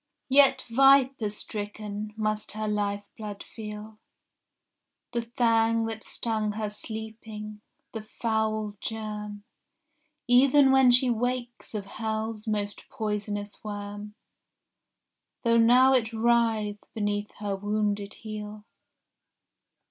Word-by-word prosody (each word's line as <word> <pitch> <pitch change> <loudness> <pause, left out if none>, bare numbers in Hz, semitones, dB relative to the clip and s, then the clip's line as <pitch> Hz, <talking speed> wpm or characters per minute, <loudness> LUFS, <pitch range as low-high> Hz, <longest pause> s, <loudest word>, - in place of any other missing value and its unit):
Yet 270 -1 +5
viper 265 -2 +5
stricken 210 0 -5
must 215 -1 -1
her 215 0 -3
lifeblood 205 0 -3
feel 215 0 -9 1.1
The 235 - 0 0.2
fang 230 -1 +3
that 225 -1 -5
stung 215 -2 -2
her 210 -1 -3
sleeping, 220 -1 -7 0.3
the 225 - -4
foul 215 -1 -1
germ 210 -2 -5 0.8
Even 265 +2 +6
when 265 -1 +6
she 245 +1 +5
wakes 240 0 -3
of 205 -2 -3
hell's 220 +1 -4
most 205 -1 -3
poisonous 210 -3 -4
worm, 205 0 -6 1.3
Though 230 -1 +4
now 250 +3 +6
it 230 -4 +2
writhe 225 -2 +1
beneath 205 -1 -1
her 205 -2 -3
wounded 205 0 -1
heel. 210 -1 -7
215 Hz, 100 wpm, -27 LUFS, 210-230 Hz, 1.3 s, Even